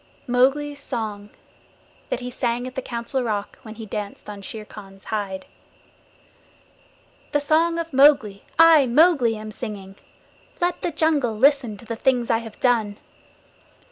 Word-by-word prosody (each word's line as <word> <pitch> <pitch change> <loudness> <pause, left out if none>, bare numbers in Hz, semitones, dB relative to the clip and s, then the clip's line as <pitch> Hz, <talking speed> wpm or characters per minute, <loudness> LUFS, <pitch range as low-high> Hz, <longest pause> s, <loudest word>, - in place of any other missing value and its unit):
Mowgli's 275 +4 +1
Song 215 -7 -5 0.8
THAT 240 - -2
HE 250 - -5
SANG 245 -1 -2
AT 255 - -7
THE 265 - -3
COUNCIL 240 +2 -3
ROCK 210 -4 -3
WHEN 220 -3 -10
HE 225 0 -8
DANCED 210 0 -6
ON 200 -1 -9
SHERE 215 +2 -8
KHAN'S 195 -2 -13
HIDE 195 -3 -4 1.9
The 290 - +3
Song 320 +3 +2
of 330 -2 -4
Mowgli 265 -8 +4
I, 320 -4 +7
Mowgli, 270 -3 +4
am 215 0 -8
singing. 205 -4 -7 0.6
Let 350 0 0
the - - -1
jungle 295 -8 +1
listen 260 -4 +3
to 235 - -15
the 230 +1 -4
things 245 0 +1
I 225 - +2
have 225 -2 -11
done. 225 -5 +1
240 Hz, 145 wpm, -23 LUFS, 215-285 Hz, 1.9 s, I